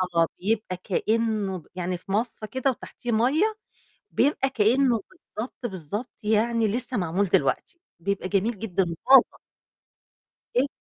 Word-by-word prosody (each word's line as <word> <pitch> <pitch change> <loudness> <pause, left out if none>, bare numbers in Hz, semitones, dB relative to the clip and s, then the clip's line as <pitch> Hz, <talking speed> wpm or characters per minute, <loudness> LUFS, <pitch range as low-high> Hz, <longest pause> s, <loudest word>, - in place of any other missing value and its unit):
آه، 165 0 +4
بيبقى 205 -1 -1
كإنّه 215 +1 0
ب 165 - -14
يعني 180 0 -2
في 185 - -10
مَصفه 220 +1 -1
كده 260 +4 0
وتحتيه 245 -1 -6
مَيّة، 300 - +2 0.5
بيبقى 270 0 +2
كإنه 245 0 +3
بالضبط، 240 +3 -8
بالضبط 205 - -5
يعني 220 +2 +2
لسه 240 +3 -1
معمول 180 +2 +1
دلوقتي، 340 - 0 0.2
بيبقى 200 +1 -2
جميل 205 +2 0
جدًا 195 -3 0
وطازة. 255 +10 +5 1.2
جدًا. 255 +3 +4
220 Hz, 130 wpm, -26 LUFS, 195-245 Hz, 1.2 s, وطازة